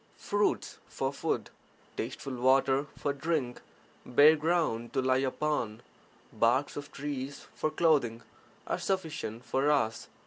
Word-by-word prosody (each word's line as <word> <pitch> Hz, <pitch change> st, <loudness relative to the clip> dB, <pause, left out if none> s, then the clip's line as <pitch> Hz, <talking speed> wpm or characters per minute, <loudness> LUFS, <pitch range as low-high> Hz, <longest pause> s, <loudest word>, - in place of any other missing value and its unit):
Fruits 205 Hz, 0 st, 0 dB
for -, -, -2 dB
food, -, -, -2 dB, 0.4 s
tasteful 135 Hz, -, -4 dB
water 135 Hz, +2 st, +3 dB
for 145 Hz, -, -1 dB
drink, 140 Hz, -4 st, -2 dB, 0.4 s
bare 145 Hz, +5 st, +6 dB
ground 150 Hz, -8 st, 0 dB
to 135 Hz, -, +1 dB
lie 130 Hz, 0 st, +3 dB
upon, 130 Hz, -4 st, -1 dB, 0.5 s
barks 125 Hz, +5 st, +2 dB
of 145 Hz, 0 st, -7 dB
trees 140 Hz, -1 st, -5 dB
for 155 Hz, -, -1 dB
clothing, 150 Hz, -8 st, +2 dB, 0.4 s
are -, -, -2 dB
sufficient 160 Hz, -, -3 dB
(for 135 Hz, +2 st, +1 dB
us) 115 Hz, -6 st, +1 dB
140 Hz, 125 wpm, -30 LUFS, 125-150 Hz, 0.5 s, bare